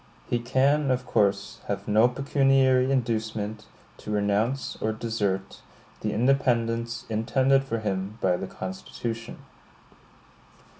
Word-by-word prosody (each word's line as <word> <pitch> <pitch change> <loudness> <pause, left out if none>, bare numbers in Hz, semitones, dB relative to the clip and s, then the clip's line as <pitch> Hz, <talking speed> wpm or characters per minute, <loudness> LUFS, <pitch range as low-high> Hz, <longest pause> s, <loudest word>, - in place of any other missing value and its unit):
He 120 - 0
can, 135 +4 +2
of 125 0 0
course, 100 +2 +1
have 100 0 -3
no 110 +3 +5
pecuniary 135 0 +3
inducement 110 -4 -2 0.3
to - - -10
renounce 105 +5 0
or 110 0 0
desert 105 -4 -2 0.4
the 105 - -2
independence 115 -1 +1
intended 130 +5 +2
for 125 -4 -2
him 100 -1 -3
by 90 -4 +2
the 95 - -4
Constitution. 115 +6 -6
115 Hz, 110 wpm, -26 LUFS, 105-130 Hz, 0.4 s, no